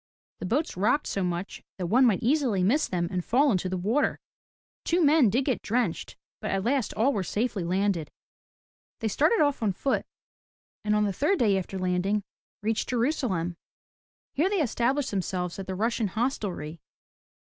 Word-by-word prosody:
The 185 - -4
boats 290 - 0
rocked 235 +10 +2
so 195 - -2
much 180 +2 -3 0.2
that 185 - -3
one 245 +8 +4
might 205 -6 +1
easily 245 -7 +2
miss 275 +11 +2
them 175 -2 -1
and 180 -2 -2
fall 275 +7 +3
into 185 -2 0
the 185 - -2
water. 220 +11 +1 0.7
Two 345 -1 +2
men 290 -5 +5
did 250 +6 +1
get 260 -5 0
drenched, 245 +3 -1 0.2
but - - -4
at 195 -1 0
last 255 +1 +1
all 265 +6 +2
were 205 - 0
safely 210 +1 -1
landed. 185 -2 0 0.9
They 225 - 0
started 310 - +3
off 285 -4 +2
on 210 -4 +1
foot, 270 +9 -1 0.8
and 210 0 +1
on 210 - +3
the 200 -2 0
third 335 - +1
day 210 - +3
after 190 0 -3
landing, 185 +3 0 0.4
reached 220 +1 -1
Jerusalem. 230 - 0 0.8
Here 320 +7 +2
they 395 -5 +1
established 260 +3 0
themselves 185 -2 -2
at 195 - -6
the 190 - -3
Russian 225 +2 0
Hostelry. 190 - -3
215 Hz, 170 wpm, -27 LUFS, 185-265 Hz, 0.9 s, men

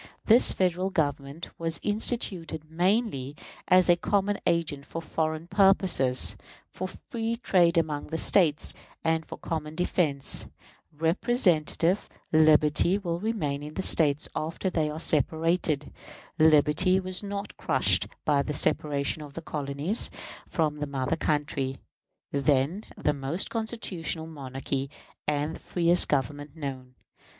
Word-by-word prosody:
This 230 +3 +5
Federal 185 0 0
Government 145 -2 -2
was 165 -1 -1
instituted 185 -8 -2
mainly 175 - 0 0.3
as 185 0 +5
a 175 - +6
common 200 +3 0
agent 165 -5 0
for 165 - -5
foreign 160 -1 -2
purposes, 190 -9 +3 0.4
for 185 - -4
free 225 +4 -4
trade 180 -7 +3
among 155 -3 0
the 160 - -3
States, 160 -4 +3 0.3
and 160 0 +1
for - - -9
common 155 -1 -4
defense. 160 -5 0 0.4
Representative 170 - +1 0.2
liberty 155 +3 +4
will 170 -4 -3
remain 170 -10 -2
in 150 +1 -8
the 190 - -2
States 150 -5 +3
after 165 +4 -2
they 155 -3 0
are 150 +1 -5
separated. 160 0 0 0.5
Liberty 155 +4 +4
was 185 -1 -4
not 200 0 -5
crushed - - +2 0.2
by 145 -2 +3
the 150 +1 -3
separation 145 +1 0
of 145 -1 -10
the 165 - -5
colonies 145 +8 -1 0.4
from 155 -3 0
the 150 0 -3
mother 135 +2 -1
country, 145 -4 -1 0.5
then 140 +7 +1
the 150 - +1
most 145 +6 -3
constitutional 200 -8 -3
monarchy 135 -2 -5 0.4
and 150 +1 0
the - - -9
freest 175 0 +3
Government 145 +1 -2
known. 130 -4 -7
160 Hz, 125 wpm, -27 LUFS, 145-185 Hz, 0.5 s, a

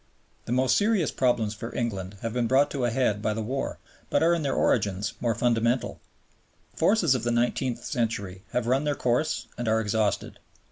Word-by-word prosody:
The - - -5
most 130 +1 +3
serious 205 -5 +2
problems 120 -5 +1
for 115 +2 -7
England 100 -5 -3
have 115 -1 -2
been 120 -1 0
brought 135 +4 +3
to 135 -4 -1
a - - +2
head 115 -4 0
by 110 0 0
the 110 - -2
war, 135 +5 -3 0.3
but - - +2
are 170 +1 +4
in 170 - 0
their 140 -3 -1
origins 100 +1 +1
more 115 -2 +1
fundamental. 120 +1 +1 0.7
The - - -31
forces 190 -9 +3
of 130 - -1
the 120 - -1
nineteenth 120 +1 0
century 105 -7 -2
have 125 - -1
run 130 +4 +2
their 145 -1 0
course 135 +7 0
and 120 - -2
are 110 0 +3
exhausted. 110 -1 -1
120 Hz, 195 wpm, -26 LUFS, 110-130 Hz, 0.7 s, are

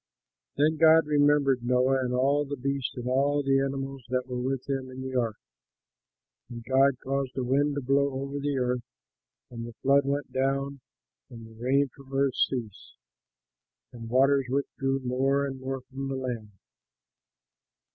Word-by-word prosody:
Then 155 +2 +3
God 160 0 +6
remembered 145 -3 +3
Noah 125 +2 +2
and 125 - -2
all 135 +3 +2
the 145 0 -5
beasts 140 0 -2
and 125 0 -5
all 140 +3 +2
the 135 0 +3
animals 135 -1 -3
that 125 0 0
were 125 -1 -4
with 130 0 -2
him 135 -2 -2
in 130 0 -9
the 130 0 -5
ark. 115 -4 0 1.1
And 120 -1 -8
God 135 +2 +3
caused 135 -1 -2
a 130 - 0
wind 140 +3 +1
to 145 - -2
blow 140 +2 +2
over 140 +1 -4
the 140 -1 -1
earth, 125 -1 0 0.7
and 115 -1 -6
the 120 - -10
flood 140 +1 +4
went 140 +1 -2
down, 135 +1 -1 0.5
the - - -12 0.2
rain 130 +5 +1
from 135 +2 -17
heaven 135 0 +1
ceased, 115 -6 -3 1.0
and 115 -2 -8
the - - -10
waters 135 0 +4
withdrew 135 0 -1
more 135 +2 +1
and 135 -1 -5
more 135 0 -4
from 135 +2 -6
the 135 - -3
land. 125 -5 -4
135 Hz, 165 wpm, -27 LUFS, 125-140 Hz, 1.1 s, God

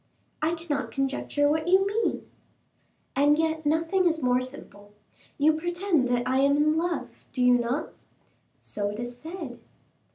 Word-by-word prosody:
"I 320 +2 +1
cannot 320 -4 -3
conjecture 275 +1 0
what 315 +2 0
you 380 +2 +5
mean." 425 +3 -1 0.9
"And 290 +2 +4
yet 320 -1 0
nothing 330 +4 +2
is 320 -3 0
more 250 0 +3
simple. 205 -6 -11 0.4
You 305 +2 +4
pretend 345 -3 0
that 245 0 0
I 260 +1 +2
am 280 +1 +4
in 305 +1 +3
love, 340 +1 -1 0.2
do 250 - -1
you 250 0 +6
not?" 245 +4 -1 0.7
"So 205 -1 -3
it 205 +1 -6
is 240 0 -5
said." 315 -2 -8
295 Hz, 155 wpm, -27 LUFS, 255-325 Hz, 0.9 s, you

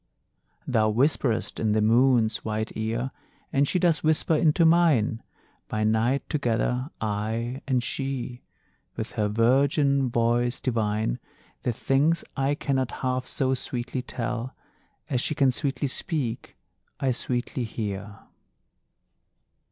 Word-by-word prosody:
Thou 110 -1 +2
whisperest 120 0 +1
in 110 -2 +1
the 110 - +2
Moon's 115 0 +4
white 110 0 -3
ear, 115 +4 -2 0.4
And 140 +1 +3
she 185 - +1
does 170 -4 +2
whisper 155 +1 +2
into 160 +1 +3
mine, 160 -10 +3 0.5
By 110 0 -1
night 110 +5 +1
together, 125 -1 0
I 110 +4 -2
and 125 -3 +1
she 130 -2 -3 0.5
With 110 - -4
her 105 -3 0
virgin 135 +5 +3
voice 120 +1 +1
divine, 110 - -1 0.4
The 125 - 0
things 140 +7 +1
I 135 +2 +1
cannot 135 -3 -1 0.2
half 130 0 -1
so 130 -1 0
sweetly 125 0 -3
tell 125 0 -4 0.5
As 125 -3 0
she 155 - -1
can 135 -2 +4
sweetly 140 +1 -1
speak, 135 -4 -3 0.4
I 135 - +1
sweetly 125 +2 -2
hear. 100 -2 -5
125 Hz, 120 wpm, -26 LUFS, 110-135 Hz, 0.5 s, Moon's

